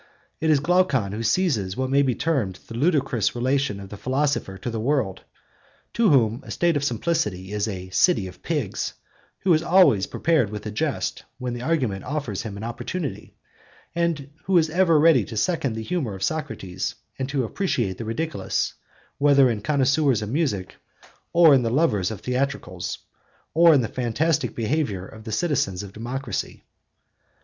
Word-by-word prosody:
It 160 Hz, -, 0 dB
is 150 Hz, -2 st, +5 dB
Glaucon 145 Hz, -, +2 dB
who 105 Hz, +3 st, -4 dB
seizes 115 Hz, -, +1 dB
what 130 Hz, 0 st, -1 dB
may 140 Hz, +1 st, +4 dB
be 130 Hz, -4 st, +1 dB
termed 135 Hz, -, 0 dB
the -, -, -9 dB
ludicrous 130 Hz, -, +1 dB
relation 130 Hz, -3 st, 0 dB
of 100 Hz, -1 st, -9 dB
the 105 Hz, -, -8 dB
philosopher 130 Hz, -4 st, -1 dB
to 120 Hz, -, -4 dB
the 115 Hz, -, -3 dB
world, 120 Hz, -5 st, 0 dB, 0.7 s
to 230 Hz, -3 st, +3 dB
whom 120 Hz, -4 st, +3 dB
a -, -, -13 dB
state 170 Hz, -2 st, +1 dB
of 145 Hz, -, 0 dB
simplicity 110 Hz, -, -1 dB
is 105 Hz, 0 st, 0 dB
'a 95 Hz, -3 st, -6 dB
city 110 Hz, -, +3 dB
of 90 Hz, -, -12 dB
pigs,' -, -, -2 dB, 0.5 s
who 185 Hz, -, +4 dB
is 155 Hz, -, +3 dB
always 165 Hz, -, +4 dB
prepared 155 Hz, -10 st, +1 dB
with 105 Hz, 0 st, -7 dB
a 105 Hz, -, -3 dB
jest 105 Hz, -, -2 dB
when 125 Hz, -1 st, -4 dB
the 120 Hz, -, -5 dB
argument 125 Hz, -10 st, 0 dB
offers 130 Hz, -8 st, -3 dB
him 105 Hz, -3 st, -6 dB
an 105 Hz, -, -7 dB
opportunity, 140 Hz, +7 st, -5 dB, 0.6 s
and 165 Hz, -5 st, -1 dB
who 190 Hz, -1 st, +3 dB
is 160 Hz, -1 st, +3 dB
ever 170 Hz, -2 st, +4 dB
ready 155 Hz, -7 st, +5 dB
to 110 Hz, -, -7 dB
second 140 Hz, -, 0 dB
the 110 Hz, -, -4 dB
humour 130 Hz, -, -2 dB
of 95 Hz, -, -6 dB
Socrates 115 Hz, -, -3 dB, 0.2 s
and 130 Hz, 0 st, -2 dB
to 140 Hz, -2 st, 0 dB
appreciate 115 Hz, -, -1 dB
the 115 Hz, -, -4 dB
ridiculous, 155 Hz, +9 st, -2 dB, 0.5 s
whether 140 Hz, -3 st, +5 dB
in 115 Hz, -, -1 dB
the 105 Hz, -, -10 dB
connoisseurs 140 Hz, -3 st, +2 dB
of 105 Hz, -, -5 dB
music, 115 Hz, -, -1 dB, 0.5 s
or 170 Hz, -3 st, +7 dB
in 135 Hz, -, +5 dB
the 115 Hz, -, 0 dB
lovers 115 Hz, -, +2 dB
of 110 Hz, -3 st, -7 dB
theatricals, 125 Hz, -9 st, -2 dB, 0.6 s
or 170 Hz, +1 st, +7 dB
in 145 Hz, -4 st, +5 dB
the 115 Hz, -, -1 dB
fantastic 125 Hz, +2 st, 0 dB
behaviour 115 Hz, -6 st, -1 dB
of 110 Hz, +2 st, -13 dB
the 110 Hz, -, -5 dB
citizens 105 Hz, -, 0 dB
of 100 Hz, -1 st, -10 dB
democracy. 125 Hz, +5 st, -4 dB
130 Hz, 175 wpm, -24 LUFS, 105-155 Hz, 0.7 s, or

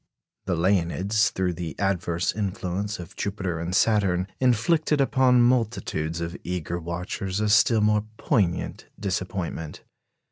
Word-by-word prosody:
The -, -, 0 dB
Leonids, 95 Hz, +4 st, +2 dB
through 90 Hz, -1 st, -1 dB
the 85 Hz, -1 st, -6 dB
adverse 90 Hz, -3 st, 0 dB
influence 100 Hz, 0 st, -2 dB
of 90 Hz, +1 st, -10 dB
Jupiter 95 Hz, -4 st, -3 dB
and 85 Hz, +2 st, -3 dB
Saturn, 100 Hz, -5 st, +3 dB
inflicted 145 Hz, +5 st, +2 dB
upon 130 Hz, -3 st, +4 dB
multitudes 110 Hz, -9 st, 0 dB
of 85 Hz, +1 st, -4 dB
eager 90 Hz, -1 st, -3 dB
watchers 90 Hz, +3 st, -4 dB
a 105 Hz, 0 st, +1 dB
still 110 Hz, +1 st, +5 dB
more 105 Hz, 0 st, +2 dB
poignant 100 Hz, -, 0 dB
disappointment. 95 Hz, -5 st, -4 dB
95 Hz, 120 wpm, -25 LUFS, 85-110 Hz, -, still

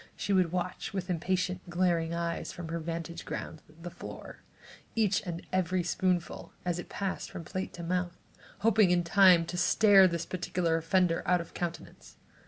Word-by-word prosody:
Often -, -, -27 dB
she 200 Hz, -, -1 dB
would 185 Hz, -3 st, +3 dB
watch 180 Hz, +2 st, -3 dB
with 190 Hz, -1 st, -3 dB
impatient, 180 Hz, +1 st, -1 dB
glaring 175 Hz, -2 st, +1 dB
eyes, 170 Hz, 0 st, -3 dB
from 170 Hz, -2 st, -8 dB
her 170 Hz, +1 st, -2 dB
vantage 170 Hz, +1 st, -5 dB
ground, 155 Hz, -, -6 dB, 0.2 s
the 175 Hz, -, -6 dB
floor, -, -, -10 dB, 0.5 s
each 210 Hz, -3 st, +2 dB
and 170 Hz, -1 st, -5 dB
every 185 Hz, -1 st, +1 dB
spoonful, 175 Hz, 0 st, -1 dB
as 175 Hz, -1 st, -1 dB
it -, -, -8 dB
passed 195 Hz, -2 st, -3 dB
from 185 Hz, -3 st, -7 dB
plate 185 Hz, +4 st, -4 dB
to 170 Hz, -, -7 dB
mouth, 180 Hz, 0 st, -2 dB, 0.4 s
hoping 220 Hz, -3 st, +4 dB
in 175 Hz, 0 st, +3 dB
time 180 Hz, -1 st, +6 dB
to 180 Hz, +2 st, -5 dB
stare 200 Hz, 0 st, +6 dB
this 170 Hz, -2 st, -3 dB
particular 180 Hz, -2 st, -1 dB
offender 165 Hz, +1 st, +2 dB
out 180 Hz, 0 st, +4 dB
of 170 Hz, -, -8 dB
countenance. 175 Hz, -1 st, -6 dB
175 Hz, 175 wpm, -30 LUFS, 170-185 Hz, 0.5 s, time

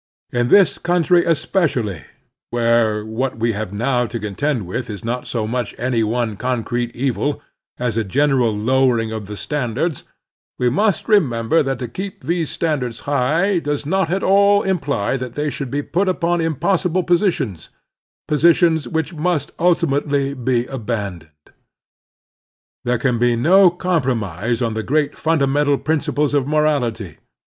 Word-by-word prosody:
In 120 Hz, 0 st, +1 dB
this 185 Hz, -1 st, +4 dB
coxmtry 175 Hz, 0 st, +2 dB
especially, 145 Hz, -, 0 dB, 0.5 s
where 115 Hz, -3 st, +1 dB
what 115 Hz, +3 st, -3 dB
we 115 Hz, +1 st, +1 dB
have 105 Hz, -2 st, -4 dB
now 120 Hz, +3 st, 0 dB
to 115 Hz, +1 st, -5 dB
contend 110 Hz, +3 st, -2 dB
with 115 Hz, +8 st, -4 dB
is 105 Hz, +1 st, -7 dB
not 125 Hz, +2 st, -3 dB
so 115 Hz, -3 st, -2 dB
much 120 Hz, +1 st, -3 dB
any 120 Hz, -2 st, 0 dB
one 110 Hz, -1 st, -1 dB
concrete 120 Hz, 0 st, -2 dB
evil 135 Hz, +3 st, -1 dB, 0.4 s
as 120 Hz, -3 st, -2 dB
a 115 Hz, -, +1 dB
general 130 Hz, +2 st, +2 dB
lowering 120 Hz, 0 st, +2 dB
of 110 Hz, -3 st, -5 dB
the 105 Hz, 0 st, -7 dB
standards, 145 Hz, +3 st, -2 dB, 0.5 s
we 125 Hz, -1 st, +1 dB
must 200 Hz, -, +1 dB
remember 155 Hz, -, +3 dB
that 135 Hz, -2 st, -1 dB
to 125 Hz, -, -5 dB
keep 190 Hz, -, -7 dB
these 170 Hz, -2 st, -1 dB
standards 135 Hz, -8 st, -2 dB
high 155 Hz, +8 st, +1 dB
does 145 Hz, -2 st, -3 dB
not 190 Hz, +2 st, 0 dB
at 190 Hz, +3 st, -1 dB
all 200 Hz, +1 st, +4 dB
imply 140 Hz, -, -1 dB
that 125 Hz, -1 st, -6 dB
they 150 Hz, +1 st, -1 dB
shotild 140 Hz, -2 st, -5 dB
be 145 Hz, +3 st, -2 dB
put 190 Hz, +6 st, 0 dB
upon 175 Hz, -2 st, 0 dB
impossible 175 Hz, +3 st, 0 dB
positions 170 Hz, -, 0 dB, 0.3 s
— -, -, -82 dB
positions 160 Hz, +1 st, +3 dB
which 160 Hz, 0 st, -2 dB
must 155 Hz, -2 st, -2 dB
ulti 170 Hz, -1 st, +2 dB
mately 140 Hz, -2 st, -1 dB
be 125 Hz, -2 st, +1 dB
abandoned. 105 Hz, -10 st, -5 dB, 1.5 s
There 125 Hz, 0 st, +1 dB
can 120 Hz, -1 st, 0 dB
be 120 Hz, 0 st, +3 dB
no 180 Hz, +10 st, +5 dB
compro 170 Hz, -8 st, 0 dB
mise 110 Hz, +5 st, -2 dB
on 115 Hz, -2 st, -1 dB
the 110 Hz, -, -2 dB
great 145 Hz, +5 st, 0 dB
fimdamental 145 Hz, -2 st, +1 dB
principles 150 Hz, -1 st, 0 dB
of 140 Hz, -2 st, +1 dB
morality. 145 Hz, -, 0 dB
135 Hz, 150 wpm, -19 LUFS, 115-160 Hz, 1.5 s, no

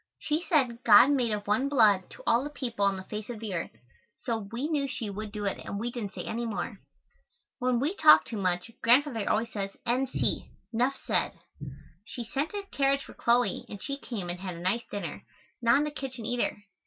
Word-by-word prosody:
She 305 Hz, +2 st, -1 dB
said 255 Hz, -9 st, +1 dB
God 235 Hz, +5 st, +8 dB
made 250 Hz, -5 st, +2 dB
of 205 Hz, -1 st, -2 dB
one 240 Hz, +7 st, +1 dB
blood 210 Hz, -9 st, +5 dB, 0.2 s
all 235 Hz, +3 st, +3 dB
the 290 Hz, -, -4 dB
people 240 Hz, -8 st, -3 dB
on 195 Hz, -1 st, +2 dB
the 190 Hz, -, -7 dB
face 210 Hz, +3 st, -6 dB
of 235 Hz, -3 st, -5 dB
the 215 Hz, -3 st, -4 dB
earth, 170 Hz, -, -2 dB, 0.5 s
so 225 Hz, -4 st, -3 dB
we 245 Hz, +5 st, -2 dB
knew 295 Hz, -3 st, 0 dB
she 225 Hz, -5 st, -4 dB
would 210 Hz, +1 st, -6 dB
do 210 Hz, -1 st, -4 dB
it 195 Hz, -, -1 dB
and 200 Hz, -, -4 dB
we 240 Hz, +3 st, -2 dB
didn't 225 Hz, -5 st, -5 dB
say -, -, -5 dB
any 235 Hz, +2 st, -3 dB
more. 200 Hz, 0 st, -4 dB, 0.8 s
When 250 Hz, -2 st, +1 dB
we 295 Hz, +8 st, 0 dB
talk 315 Hz, -6 st, +7 dB
too 225 Hz, -, -5 dB
much, 180 Hz, +2 st, -1 dB
Grandfather 240 Hz, -2 st, +3 dB
always 225 Hz, +2 st, 0 dB
says 195 Hz, -2 st, -4 dB
N. 250 Hz, +3 st, +1 dB
C. -, -, -1 dB, 0.2 s
(nuff 250 Hz, +4 st, +1 dB
ced). -, -, +1 dB, 0.7 s
She 240 Hz, +3 st, -6 dB
sent 275 Hz, +7 st, -2 dB
a 405 Hz, -, -3 dB
carriage 275 Hz, 0 st, +2 dB
for -, -, -12 dB
Chloe 240 Hz, +1 st, +2 dB
and 205 Hz, -, -7 dB
she 275 Hz, +7 st, -3 dB
came 215 Hz, -10 st, -5 dB
and 175 Hz, -, -6 dB
had 185 Hz, -2 st, -5 dB
a -, -, -8 dB
nice 185 Hz, +7 st, 0 dB
dinner, 175 Hz, -7 st, -5 dB, 0.4 s
not 235 Hz, +2 st, +5 dB
in 290 Hz, -, +2 dB
the 300 Hz, -, -2 dB
kitchen 260 Hz, -5 st, -6 dB
either. 240 Hz, -4 st, -1 dB
235 Hz, 215 wpm, -29 LUFS, 205-270 Hz, 0.8 s, God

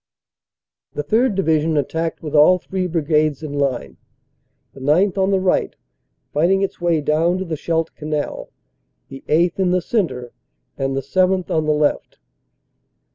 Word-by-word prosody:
The 145 Hz, -, -3 dB
3rd. 220 Hz, -, +1 dB
Division 160 Hz, -4 st, +1 dB
attacked 160 Hz, +4 st, -2 dB
with 150 Hz, -, -6 dB
all 155 Hz, +5 st, +6 dB
three 185 Hz, +1 st, -3 dB
brigades 155 Hz, -3 st, 0 dB
in 150 Hz, -2 st, -5 dB
line, 140 Hz, -3 st, -2 dB, 0.8 s
the -, -, -13 dB
9th. 170 Hz, +8 st, +2 dB
on 190 Hz, 0 st, +2 dB
the 195 Hz, -1 st, +2 dB
right, 185 Hz, -1 st, 0 dB, 0.6 s
righting 180 Hz, +6 st, +2 dB
its 195 Hz, -, -4 dB
way 170 Hz, -3 st, +1 dB
down 160 Hz, +4 st, +1 dB
to 190 Hz, -, -4 dB
the 165 Hz, -2 st, -3 dB
Scheldt 165 Hz, +1 st, -2 dB
Canal, 150 Hz, -1 st, -4 dB, 0.6 s
the 135 Hz, 0 st, -10 dB
8th. 170 Hz, +4 st, +2 dB
in 185 Hz, -2 st, +2 dB
the 180 Hz, +1 st, +2 dB
centre, 150 Hz, -, -2 dB, 0.4 s
and 135 Hz, 0 st, -2 dB
the -, -, 0 dB
7th. 185 Hz, +5 st, +1 dB
on 155 Hz, -1 st, 0 dB
the -, -, +3 dB
left. 150 Hz, -1 st, -1 dB
160 Hz, 155 wpm, -20 LUFS, 150-185 Hz, 0.8 s, all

